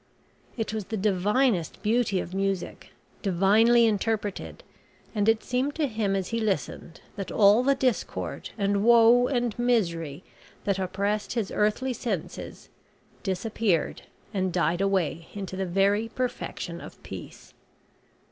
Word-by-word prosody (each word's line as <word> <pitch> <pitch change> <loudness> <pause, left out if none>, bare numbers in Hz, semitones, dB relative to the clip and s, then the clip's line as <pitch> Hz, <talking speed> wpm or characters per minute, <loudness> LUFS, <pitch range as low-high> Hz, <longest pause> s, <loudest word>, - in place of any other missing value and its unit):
It 220 -1 -2
was 215 -3 -3
the 220 +2 -4
divinest 205 0 +1
beauty 215 -3 +2
of 180 - -6
music, 195 -1 -2 0.3
divinely 215 +5 +4
interpreted, 210 -1 -2 0.5
and 210 -1 +2
it 225 0 +2
seemed 255 +3 -1
to 315 - +1
him 215 -6 -1
as 190 -2 -2
he 230 - -1
listened 180 - -3 0.2
that 195 - -5
all 210 +2 +6
the 275 +2 +3
discord 255 -4 -2
and 200 -1 +1
woe 235 +1 +6
and 245 -4 0
misery 170 - 0 0.4
that 195 -1 0
oppressed 200 +3 -1
his 230 -5 -2
earthly 215 +5 +1
senses, 210 -9 -5 0.5
disappeared 195 -2 -1 0.3
and 190 -2 0
died 175 0 +1
away 180 -4 0
into 195 -2 -5
the 190 0 -2
very 200 +5 +2
perfection 250 +1 -4
of - - -12
peace. - - -10
205 Hz, 130 wpm, -27 LUFS, 190-230 Hz, 0.5 s, all